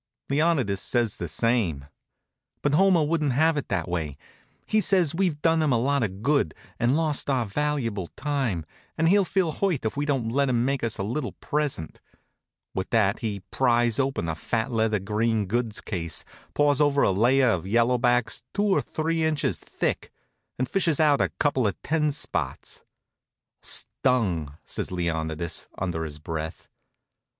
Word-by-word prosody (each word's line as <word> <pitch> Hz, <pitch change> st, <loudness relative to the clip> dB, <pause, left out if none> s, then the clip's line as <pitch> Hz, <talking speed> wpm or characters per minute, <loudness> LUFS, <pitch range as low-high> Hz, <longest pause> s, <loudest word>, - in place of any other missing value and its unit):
Leonidas 140 Hz, -, +2 dB
says 120 Hz, -4 st, 0 dB
the 85 Hz, -, -4 dB
same. 90 Hz, -, 0 dB, 0.8 s
But 145 Hz, -, +2 dB
Homer 185 Hz, 0 st, +5 dB
wouldn't 150 Hz, -3 st, +1 dB
have 160 Hz, +4 st, +3 dB
it 145 Hz, -, -3 dB
that 90 Hz, -5 st, -1 dB
way. 80 Hz, -5 st, -3 dB, 0.5 s
He 215 Hz, -, +2 dB
says 180 Hz, -7 st, +3 dB
we've 170 Hz, -4 st, 0 dB
done 165 Hz, -1 st, +3 dB
him 155 Hz, -3 st, +2 dB
a 120 Hz, -, +4 dB
lot 140 Hz, +3 st, +1 dB
of 100 Hz, -2 st, -3 dB
good, 140 Hz, -, +2 dB, 0.2 s
and 120 Hz, +5 st, +2 dB
lost 155 Hz, -3 st, 0 dB
our 130 Hz, -4 st, +1 dB
valuable 115 Hz, -5 st, -1 dB
time, 135 Hz, -, -1 dB, 0.3 s
and 165 Hz, -, +2 dB
he'll 200 Hz, +2 st, +5 dB
feel 185 Hz, -3 st, 0 dB
hurt 170 Hz, -, -1 dB
if 110 Hz, -, -1 dB
we 145 Hz, +1 st, -1 dB
don't 130 Hz, -6 st, 0 dB
let 140 Hz, +2 st, +2 dB
him 120 Hz, -1 st, +2 dB
make 135 Hz, -1 st, -1 dB
us 115 Hz, -1 st, -1 dB
a 100 Hz, -, -2 dB
little 120 Hz, +1 st, -3 dB
present. 145 Hz, -, -3 dB, 0.7 s
With 95 Hz, 0 st, -3 dB
that 105 Hz, -3 st, +2 dB
he 105 Hz, -4 st, -3 dB
pries 120 Hz, -3 st, +2 dB
open 135 Hz, -10 st, 0 dB
a 80 Hz, -, -1 dB
fat 115 Hz, +9 st, -2 dB
leather 110 Hz, -2 st, +2 dB
green 105 Hz, +2 st, 0 dB
goods 115 Hz, +2 st, -1 dB
case, 85 Hz, -5 st, -3 dB, 0.3 s
paws 145 Hz, 0 st, +3 dB
over 145 Hz, -1 st, +3 dB
a -, -, +4 dB
layer 125 Hz, +6 st, +4 dB
of 95 Hz, -3 st, -1 dB
yellow 120 Hz, +4 st, +3 dB
backs 120 Hz, -1 st, +2 dB
two 205 Hz, -, +1 dB
or 195 Hz, -2 st, +3 dB
three 160 Hz, +1 st, -1 dB
inches 160 Hz, -2 st, 0 dB
thick -, -, -3 dB, 0.5 s
and 130 Hz, -, -1 dB
fishes 170 Hz, -2 st, +1 dB
out 150 Hz, -3 st, +4 dB
a -, -, +2 dB
couple 135 Hz, -6 st, +2 dB
of 100 Hz, -, -3 dB
ten 150 Hz, 0 st, +1 dB
spots. 145 Hz, -, -3 dB, 0.8 s
"Stung!" 90 Hz, -, 0 dB
says -, -, -4 dB
Leonidas, 80 Hz, -2 st, -2 dB
under 85 Hz, -3 st, -2 dB
his 75 Hz, -1 st, -7 dB
breath. 80 Hz, +1 st, -6 dB
125 Hz, 165 wpm, -26 LUFS, 100-150 Hz, 0.8 s, Homer